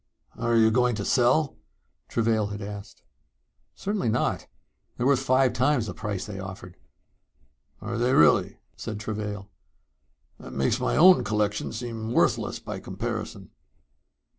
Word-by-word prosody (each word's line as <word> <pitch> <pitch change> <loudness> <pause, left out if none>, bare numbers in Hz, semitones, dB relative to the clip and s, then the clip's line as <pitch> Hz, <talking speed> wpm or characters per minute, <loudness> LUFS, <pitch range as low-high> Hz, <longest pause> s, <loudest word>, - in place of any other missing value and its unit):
"Are 115 0 +1
you 110 0 +5
going 125 0 +2
to 100 -1 -4
sell?" 130 +4 +2 0.5
Travail 110 -2 +1
had 105 0 -6
asked. 100 0 -9 0.7
"Certainly 200 - -2
not. 110 - -1 0.5
They're 120 - -1
worth 135 -1 +4
five 130 -1 +3
times 125 -1 +2
the 95 - -5
price 105 0 -4
they 105 -4 -7
offered." 95 -2 -8 1.1
"Are 115 +3 -4
they 125 +2 +2
really?" 80 - +4 0.2
said 110 -2 -6
Travail. 105 -2 -5 0.9
"That - - -10
makes 70 - +1
my 125 - 0
own 180 -5 +7
collection 105 -1 -1
seem 115 -1 -5
worthless - - +1
by - - -7
comparison." - - -5
110 Hz, 135 wpm, -26 LUFS, 105-125 Hz, 1.1 s, own